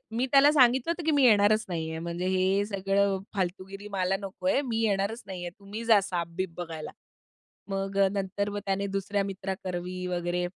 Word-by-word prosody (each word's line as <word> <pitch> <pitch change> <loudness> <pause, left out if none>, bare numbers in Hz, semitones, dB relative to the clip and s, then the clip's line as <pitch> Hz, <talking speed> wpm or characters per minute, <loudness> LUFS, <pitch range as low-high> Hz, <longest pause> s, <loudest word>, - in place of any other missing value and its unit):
मी 245 +3 0
त्याला 275 +1 +7
सांगितलं 260 +1 +4
होतं, 340 +1 -2
की 320 - +2
मी 285 -2 +3
येणारच 215 -1 +5
नाही 165 -2 -3
आहे. 160 - -4
म्हणजे 170 +2 -3
हे 190 +2 +2
सगळं 195 -1 +1 0.2
फालतूगिरी 195 +2 -4
मला 190 -1 0
नको 195 +7 -7
आहे, 280 - +3
मी 230 -4 -2
येणारच 205 +2 0
नाही 185 -2 -6
आहे, 175 - -4
तुम्ही 205 +3 -7
जा 220 -3 +6
सापबीप 180 -1 -3
बघायला. 165 -3 -6 0.8
मग 195 0 -3
अ, 195 - +5
नंतर 200 +1 -2
व 205 - -4
त्याने 195 +1 0
दुसऱ्या 195 +1 0
मित्रा 195 0 -4
करवी 180 0 -4
वगैरे, 175 0 -1
195 Hz, 185 wpm, -28 LUFS, 185-205 Hz, 0.8 s, त्याला